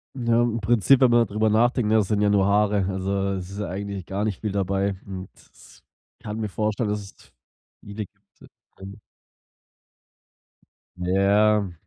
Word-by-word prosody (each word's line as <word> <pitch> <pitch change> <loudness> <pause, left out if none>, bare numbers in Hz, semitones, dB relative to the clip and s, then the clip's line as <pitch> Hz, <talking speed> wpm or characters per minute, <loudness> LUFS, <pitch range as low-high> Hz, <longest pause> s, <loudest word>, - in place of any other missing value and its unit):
Ja, 120 -1 +2
im 115 -1 -1
Prinzip, 120 +5 +3
wenn 130 - +6
man 120 0 +4
darüber 110 +1 0
nachdenkt, 115 0 +2
ja, 110 - +5
das 105 -3 +1
sind 105 -1 +1
ja 105 - +3
nur 100 -2 +3
Haare, 100 -1 +2
also 95 +1 -2
es 95 -1 -5
ist 100 - -9
ja 105 - -3
eigentlich 100 0 -5
gar 100 +2 -3
nicht 105 -3 -3
viel 105 - -2
dabei 100 0 -1
und 95 -1 -7
s - - -20 0.4
ich - - -29
kann 110 -1 -5
mir 110 - -2
vorstellen, 105 +2 -1
dass 105 0 -1
es 100 - -13
v - - -22 0.5
liegt, 105 0 -8 0.6
ähm. 100 +2 -10 2.0
Ja. 100 +2 +2
105 Hz, 170 wpm, -24 LUFS, 100-110 Hz, 2.0 s, wenn